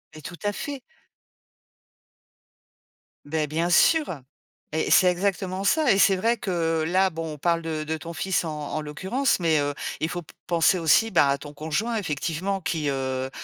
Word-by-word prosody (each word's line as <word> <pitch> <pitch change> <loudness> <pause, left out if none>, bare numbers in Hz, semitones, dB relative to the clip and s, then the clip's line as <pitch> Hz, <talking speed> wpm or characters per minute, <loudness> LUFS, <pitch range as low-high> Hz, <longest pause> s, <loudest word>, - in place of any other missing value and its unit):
Mais 155 - -10
tout 175 +3 -8
à 205 0 0
fait. 285 0 -5 2.4
Beh, 155 0 -1
bien 165 +4 -1
sûr 290 - +3 0.5
et 160 - 0
et - - -2
c'est 185 - +6
exactement 185 +1 -1
ça 305 +6 +2
et 195 - +3
c'est 195 - +5
vrai 230 +5 +1
que, 165 -6 -1
là, 190 +2 +3
bon, 160 -1 -5
on - - -13
parle 170 +2 +1
de 160 -2 -3
de 160 +1 -2
ton 165 +2 -8
fils 185 +2 -1
en 160 - -4 0.2
en 155 - -1
l'occurrence 190 - -1
mais 160 -3 +2
heu, 145 0 -1 0.3
il 160 - 0
faut 175 -1 -5
p - - -17
penser 170 +1 +3
aussi, 170 +8 +4
ben, 140 - +4
à 140 - +2
ton 145 0 -10
conjoint 160 +11 -2
effectivement 180 +1 -2
qui, 160 -4 -2
heu 130 -1 -2
170 Hz, 185 wpm, -25 LUFS, 155-195 Hz, 2.4 s, c'est